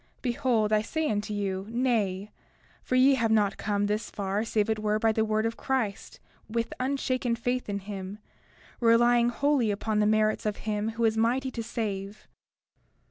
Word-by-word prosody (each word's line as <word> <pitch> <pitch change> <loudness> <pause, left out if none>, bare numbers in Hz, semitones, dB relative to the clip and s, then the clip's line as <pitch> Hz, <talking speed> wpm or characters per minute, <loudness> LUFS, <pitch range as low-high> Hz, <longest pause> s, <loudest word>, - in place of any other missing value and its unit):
Behold, 240 -4 +1
I 210 - +4
say 315 +8 -2
unto 210 +1 -2
you, 195 -1 -2
Nay; 215 -5 0 0.5
for 255 - -2
ye 260 +2 +6
have 230 -4 +1
not 210 -3 +2
come 205 -1 0
thus 210 +2 -2
far 200 +1 -2
save 215 -2 0
it 220 -1 0
were 215 0 +1
by 225 +1 +2
the 220 0 +1
word 215 0 0
of 225 0 -2
Christ 245 -7 -2 0.3
with 230 +1 -2
unshaken 255 -2 0
faith 245 0 -2
in 200 - -1
him, 195 0 -7 0.6
relying 240 0 +4
wholly 275 -2 +1
upon 210 +1 -1
the 210 - +3
merits 215 0 +2
of 210 - -2
him 210 0 -1
who 235 - +2
is 220 0 +2
mighty 255 +4 +1
to 235 - -4
save. 205 -3 -5
220 Hz, 175 wpm, -28 LUFS, 210-240 Hz, 0.6 s, ye